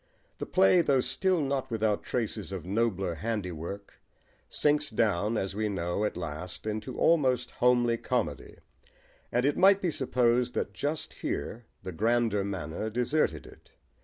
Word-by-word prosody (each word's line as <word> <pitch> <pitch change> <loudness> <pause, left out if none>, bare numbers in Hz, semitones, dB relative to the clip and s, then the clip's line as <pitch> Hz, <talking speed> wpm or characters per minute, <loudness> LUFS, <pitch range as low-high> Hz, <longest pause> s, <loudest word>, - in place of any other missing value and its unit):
The - - -4
play, 95 - +5
though 140 -5 +3
still 185 +6 +1
not 135 -2 -1
without 110 -2 0
traces 110 -5 -3
of 95 -4 -5
nobler 95 -3 0
handiwork, 95 0 -4 0.6
sinks 150 0 +1
down, 110 0 +1
as 95 -1 -2
we 105 +1 -1
know, 90 +1 -1
at 105 - -3
last 85 +3 -6
into 110 +4 -4
almost 130 -7 +2
homely 120 -1 +3
comedy, - - -2 0.7
and 125 +2 +1
it 145 - +1
might 195 +1 +6
be 180 -4 0
supposed 125 -2 +1
that 100 - -2
just 145 +10 -3
here 115 +1 -4 0.2
the 95 - -5
grander 110 +2 +1
manner 95 +1 -4
deserted 125 +7 0
it. - - -17
115 Hz, 145 wpm, -29 LUFS, 95-130 Hz, 0.7 s, might